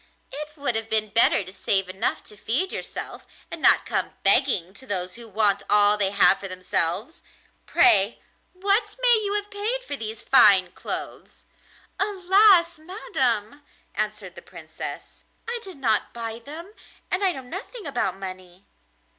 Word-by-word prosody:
It 300 Hz, +2 st, -8 dB
would 280 Hz, -5 st, -1 dB
have 225 Hz, 0 st, -2 dB
been 215 Hz, -1 st, 0 dB
better 215 Hz, -1 st, +3 dB
to 185 Hz, +1 st, -12 dB
save 195 Hz, 0 st, -1 dB
enough 185 Hz, +1 st, -3 dB
to 210 Hz, -, -12 dB
feed 240 Hz, -, -2 dB
yourself, -, -, -7 dB, 0.2 s
and -, -, -7 dB
not -, -, +5 dB
come -, -, -3 dB
begging 190 Hz, -, +3 dB
to 260 Hz, +5 st, -9 dB
those 185 Hz, -4 st, -3 dB
who 235 Hz, -1 st, -11 dB
want 205 Hz, -1 st, +1 dB
all 205 Hz, 0 st, +4 dB
they 200 Hz, -2 st, 0 dB
have 200 Hz, -1 st, +4 dB
for 195 Hz, -, -6 dB
themselves. 185 Hz, -, -2 dB, 0.5 s
Pray, 235 Hz, -, +5 dB, 0.3 s
what 400 Hz, +4 st, 0 dB
may 485 Hz, -3 st, +4 dB
you 405 Hz, 0 st, -2 dB
have 415 Hz, 0 st, -3 dB
paid 445 Hz, +5 st, -2 dB
for 290 Hz, -, -5 dB
these 220 Hz, -3 st, -7 dB
fine 195 Hz, -8 st, +5 dB
clothes?' -, -, -8 dB, 0.5 s
'Alas! 380 Hz, -3 st, +3 dB
madam,' 285 Hz, -, -2 dB, 0.3 s
answered -, -, -1 dB
the -, -, -12 dB
Princess, -, -, -10 dB, 0.2 s
'I 475 Hz, +1 st, -3 dB
did 380 Hz, -6 st, -11 dB
not 225 Hz, -6 st, -1 dB
buy 230 Hz, -1 st, -6 dB
them, 320 Hz, -, -11 dB, 0.4 s
and 365 Hz, +2 st, 0 dB
I 380 Hz, -, +4 dB
know 265 Hz, -, -8 dB
nothing 385 Hz, -, -7 dB
about 240 Hz, -9 st, -2 dB
money. 185 Hz, -1 st, -10 dB
240 Hz, 155 wpm, -24 LUFS, -, 0.5 s, not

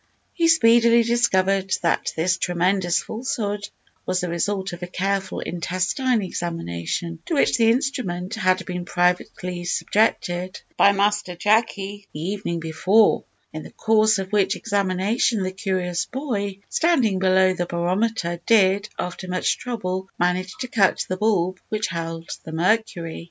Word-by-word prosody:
He 335 Hz, -2 st, +2 dB
speedily 235 Hz, -6 st, +5 dB
discovered 195 Hz, -5 st, +1 dB
that 170 Hz, -, +1 dB
this 180 Hz, +3 st, +1 dB
tremendous 175 Hz, -1 st, +1 dB
falsehood 215 Hz, -4 st, -3 dB, 0.3 s
was 185 Hz, -, -1 dB
the 180 Hz, -, -3 dB
result 190 Hz, +2 st, -2 dB
of 175 Hz, -, -8 dB
a 180 Hz, -, -4 dB
careful 195 Hz, +1 st, -2 dB
intestine 185 Hz, -, -1 dB
examination, 165 Hz, -, -4 dB
to 330 Hz, -, -1 dB
which 280 Hz, -, +3 dB
the 225 Hz, -1 st, +4 dB
instrument 225 Hz, -7 st, -1 dB
had 185 Hz, -4 st, +1 dB
been 180 Hz, -1 st, -4 dB
privately 180 Hz, 0 st, -1 dB
subjected 180 Hz, -1 st, 0 dB, 0.2 s
by 200 Hz, -, +6 dB
Master 200 Hz, -2 st, 0 dB
Jacky 205 Hz, 0 st, 0 dB
the -, -, -5 dB
evening 175 Hz, 0 st, -3 dB
before; 185 Hz, +7 st, +2 dB, 0.3 s
in 155 Hz, -, -5 dB
the -, -, -10 dB
course 220 Hz, -1 st, +3 dB
of 190 Hz, -1 st, -5 dB
which 200 Hz, -1 st, +2 dB
examination 200 Hz, +2 st, 0 dB
the 185 Hz, -, -2 dB
curious 185 Hz, -3 st, -2 dB
boy, 210 Hz, -8 st, -3 dB
standing 260 Hz, -, +2 dB
below 185 Hz, 0 st, +4 dB
the 175 Hz, -1 st, -3 dB
barometer, 175 Hz, +1 st, -1 dB
did, 200 Hz, -2 st, +4 dB
after 180 Hz, +1 st, -5 dB
much 185 Hz, 0 st, 0 dB
trouble, 190 Hz, -6 st, -4 dB
manage 180 Hz, +1 st, 0 dB
to 255 Hz, -, -2 dB
cut 205 Hz, -5 st, +2 dB
the 185 Hz, -, -2 dB
bulb 185 Hz, -3 st, +1 dB
which 215 Hz, 0 st, -1 dB
held 165 Hz, -1 st, -5 dB, 0.2 s
the 160 Hz, -, -8 dB
mercury. 170 Hz, -1 st, 0 dB
190 Hz, 140 wpm, -23 LUFS, 180-215 Hz, 0.3 s, by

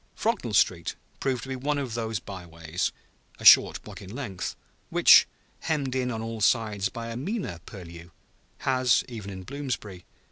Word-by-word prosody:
Frognall 125 Hz, -, -1 dB
Street 90 Hz, -4 st, +2 dB, 0.2 s
proved 130 Hz, -4 st, -1 dB
to 130 Hz, -, -8 dB
be 130 Hz, -, -2 dB
one 145 Hz, +3 st, -1 dB
of 135 Hz, -5 st, -3 dB
those 115 Hz, -2 st, -2 dB
by 95 Hz, -1 st, -8 dB
ways, 85 Hz, +1 st, -3 dB, 0.5 s
a -, -, -8 dB
short -, -, +8 dB
block -, -, -10 dB
in 95 Hz, -, -10 dB
length, 110 Hz, -5 st, -5 dB, 0.3 s
which, -, -, +7 dB, 0.3 s
hemmed 145 Hz, -5 st, -1 dB
in 130 Hz, -1 st, 0 dB
on 110 Hz, -2 st, -3 dB
all 115 Hz, -1 st, -5 dB
sides 105 Hz, -3 st, +2 dB
by 115 Hz, 0 st, -6 dB
a 115 Hz, -, -5 dB
meaner 160 Hz, -, -3 dB
purlieu, 85 Hz, -3 st, -10 dB, 0.5 s
has 130 Hz, -2 st, +3 dB
(even 110 Hz, -6 st, -7 dB
in 95 Hz, -1 st, -7 dB
Bloomsbury!) 125 Hz, -8 st, -5 dB
115 Hz, 170 wpm, -27 LUFS, 95-130 Hz, 0.5 s, short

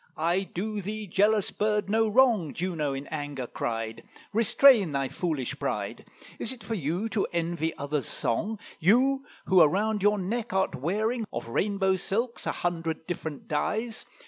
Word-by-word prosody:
"I 175 Hz, +4 st, 0 dB
do 210 Hz, +3 st, -3 dB
thee, 210 Hz, +3 st, -4 dB
jealous 205 Hz, +2 st, +2 dB
bird, 210 Hz, -1 st, 0 dB
no 220 Hz, +2 st, +2 dB
wrong," 215 Hz, -, +3 dB
Juno, 165 Hz, -5 st, -1 dB
in 135 Hz, +1 st, -5 dB
anger, 145 Hz, -4 st, -4 dB
cried: 115 Hz, -1 st, -4 dB, 0.3 s
"Restrain 225 Hz, -, +5 dB
thy 135 Hz, -1 st, 0 dB
foolish 140 Hz, -3 st, -3 dB
pride. -, -, -3 dB, 0.3 s
Is 230 Hz, -, -2 dB
it 255 Hz, -3 st, -8 dB
for 230 Hz, -, -3 dB
you 175 Hz, +3 st, -1 dB
to 215 Hz, -3 st, 0 dB
envy 170 Hz, -1 st, -1 dB
other's 145 Hz, -2 st, -2 dB
song? 210 Hz, -, -1 dB, 0.2 s
You 260 Hz, +10 st, +4 dB, 0.2 s
who 185 Hz, -2 st, +6 dB
around 205 Hz, +7 st, +3 dB
your 205 Hz, +1 st, +4 dB
neck 215 Hz, +4 st, -3 dB
art 190 Hz, 0 st, +1 dB
wearing 215 Hz, -, -1 dB
Of -, -, -5 dB
rainbow 190 Hz, -, +1 dB
silks 230 Hz, +6 st, -2 dB
a -, -, +2 dB
hundred 165 Hz, -2 st, -2 dB
different 160 Hz, -4 st, -5 dB
dyes? 220 Hz, +9 st, -2 dB
190 Hz, 155 wpm, -28 LUFS, 160-215 Hz, 0.3 s, who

